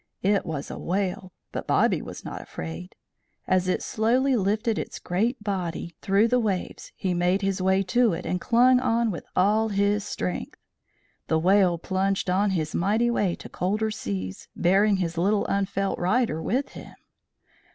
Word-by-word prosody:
It 200 0 +2
was 150 -3 -4
a - - -6
whale, 185 0 -2 0.2
but - - -5
Bobby - - +2
was - - -9
not - - -6
afraid. 80 +3 -8 0.5
As 185 0 +2
it 185 - 0
slowly 250 +5 +2
lifted 215 +2 0
its - - -5
great 220 +6 -1
body 180 -4 -3
through 200 +3 +3
the 250 +2 +2
waves 200 -6 -3
he 185 -2 -1
made 180 +3 +1
his 195 -1 0
way 190 +1 +3
to 235 +4 +3
it 165 - -5
and 180 - -2
clung 250 +2 +4
on 235 -3 +1
with 170 - -7
all 210 +4 +3
his 200 0 +1
strength. 90 - -4 0.7
The 160 - +2
whale 180 +1 +4
plunged 190 +2 -1
on 200 +3 +2
his 160 -5 -2
mighty 220 +6 +2
way 195 -6 +1
to - - -10
colder 210 +4 -1
seas, 95 - -5
bearing 195 +3 +3
his 170 -2 -2
little 200 +4 +2
unfelt 195 0 -1
rider 185 -2 +1
with 265 +10 -1
him. - - -11
195 Hz, 165 wpm, -25 LUFS, 180-215 Hz, 0.7 s, clung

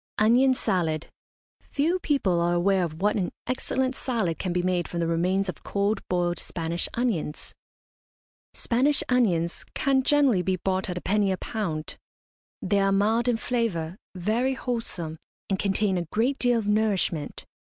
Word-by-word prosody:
ONION 250 +5 +5
SALAD. 165 -8 -1 0.5
Few 330 +6 0
people 210 - +1
are 175 +1 +2
aware 190 +1 +2
of 165 +1 -5
what 210 +1 +3
an 185 -3 -1
excellent 260 +1 -1
salad 220 -13 -1
can 185 - -2
be 175 0 0
made 180 -1 0
from 170 - -4
the 170 - +1
remains 180 +4 +1
of 180 - -5
cold 200 +2 0
boiled 175 -1 0
Spanish 170 0 -3
onions. 210 -11 -2 1.0
Spanish 270 +5 +2
onions 180 -10 +1
can 270 -1 +2
generally 270 -7 +3
be 185 +1 0
bought 190 +1 -1
at 180 - -3
a - - -4
penny 200 0 +2
a 190 - -1
pound. 165 -10 -4 0.7
They 200 +2 +2
are 195 0 +3
mild 220 +5 +2
in 240 -2 +2
flavour, 205 -10 -1 0.2
very 225 +9 0
wholesome, 185 - -4 0.3
and 190 - +1
contain 195 -1 +1
a 170 - -3
great 245 +6 0
deal 245 -1 +3
of 225 - -2
nourishment. 205 -7 0
195 Hz, 160 wpm, -26 LUFS, 175-240 Hz, 1.0 s, ONION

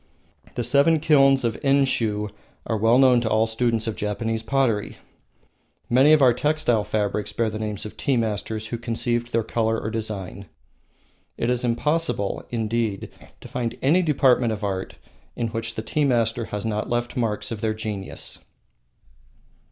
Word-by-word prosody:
The 120 - -1
Seven 145 +6 +4
Kilns 135 -3 +4
of 115 -2 -1
Enshiu 120 -7 +1 0.4
are 110 - -1
well 115 +3 +4
known 130 -2 +5
to 115 - -1
all 110 +1 +3
students 115 0 0
of 110 -2 -3
Japanese 110 +2 -2
pottery. 115 -4 0 0.9
Many 130 +5 +6
of 155 -2 +6
our 125 -2 +6
textile 145 -5 +1
fabrics 105 0 -2
bear 115 -2 0
the 110 - -5
names 105 -2 -4
of 105 - -8
tea 135 -3 +1
masters 110 -1 -2
who 120 - -4
conceived 120 0 -2
their 115 0 +1
color 115 0 0
or 110 - -4
design. 105 -3 -5 0.9
It 120 - 0
is 125 0 -1
impossible, 125 -2 0
indeed, 115 -3 -2 0.3
to - - -10
find 120 -2 -3
any 160 +7 +4
department 130 -7 +3
of 105 -1 -4
art 95 -2 -3 0.4
in 115 -1 -2
which 115 0 -4
the 110 - -4
tea 150 +5 0
masters 115 -3 +1
have 105 +1 -4
not 105 -1 -2
left 120 0 -2
marks 115 -1 -2
of 110 -2 -5
their 110 -1 0
genius. 105 -3 -5
115 Hz, 160 wpm, -23 LUFS, 110-125 Hz, 0.9 s, Many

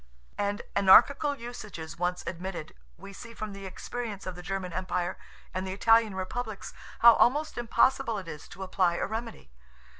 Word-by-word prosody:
And 205 0 -1
anarchical 280 +9 +6
usages 210 - -8
once 180 0 -1
admitted, 175 -2 -5 0.2
we 200 - -11
see 230 +3 -10
from 215 -2 -5
the 195 -1 -7
experience 220 +1 -6
of 185 - -4
the 180 - -9
German 185 -1 -4
Empire, 180 -1 -2 0.4
and 185 +1 -3
the 185 - -3
Italian 225 0 +4
republics, 210 +3 -5 0.3
how 235 0 +10
almost 295 +7 +2
impossible 240 0 +2
it 190 -3 -7
is 150 -2 -8
to 190 - -8
apply 185 -2 +1
a - - -1
remedy. 225 - -6
195 Hz, 160 wpm, -28 LUFS, 185-230 Hz, 0.4 s, how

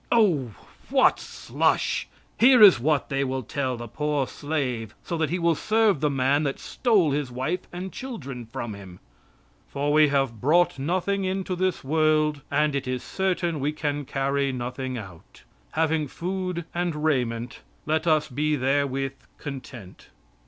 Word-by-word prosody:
Oh, 160 - +2 0.3
what - - +4
slush! - - -1 0.3
Here 250 +2 +7
is 190 -11 +9
what 150 +3 +1
they 135 -1 0
will 130 -1 -2
tell 130 +1 -2
the 120 0 -7
poor 150 +3 -1
slave, 130 -7 -3
so 170 - -3
that 160 -2 0
he 175 - 0
will 170 -1 +2
serve 215 0 +2
the 150 - +2
man 135 +1 +2
that 140 -3 -1
stole 205 - +1
his 140 -2 -2
wife 135 +9 -3
and 185 +2 -6
children 140 - -7
from 120 -2 -5
him: 95 -3 -11 0.7
"For 145 - -1
we 155 0 +6
brought 140 +4 +2
nothing 185 +6 0
into 190 0 -2
this 185 0 -1
world, 155 0 +2
and 150 +1 +2
it 140 -1 -2
is 125 -1 -2
certain 180 -4 -1
we 145 +3 -1
can 145 -2 -2
carry 140 +1 0
nothing 130 +1 -4
out. 95 -7 -11 0.3
Having 160 -2 +1
food 180 +2 -4
and 170 -3 -2
raiment 125 -5 -1 0.3
let 155 +2 0
us 155 -2 +3
be 150 +3 0
therewith 135 0 0 0.2
content." 130 -8 -9
145 Hz, 150 wpm, -25 LUFS, 130-170 Hz, 0.7 s, is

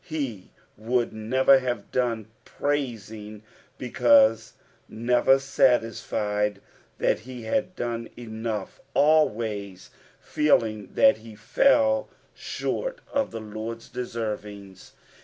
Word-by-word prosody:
He 135 - -5 0.3
would 120 +2 -1
never 130 +5 +4
have 120 -5 -4
done 120 -4 -1 0.2
praising, 110 -7 -4 0.3
because 275 - +3 0.4
never 120 +3 +3
satisfied 110 -6 0 0.4
that - - +1
he 125 +1 -9
had 180 +10 -1
done 115 -3 -4
enough; 110 -3 -5
always 110 -10 +1 0.3
feeling 110 -9 +1
that 275 0 +5
he 110 -1 -13
fell 275 - +2 0.2
«hort - - -4 0.2
of 280 -1 +1
the 115 - -6
Lord's 110 +2 -7
deaervings. 105 -5 -6
115 Hz, 95 wpm, -25 LUFS, 110-135 Hz, 0.4 s, that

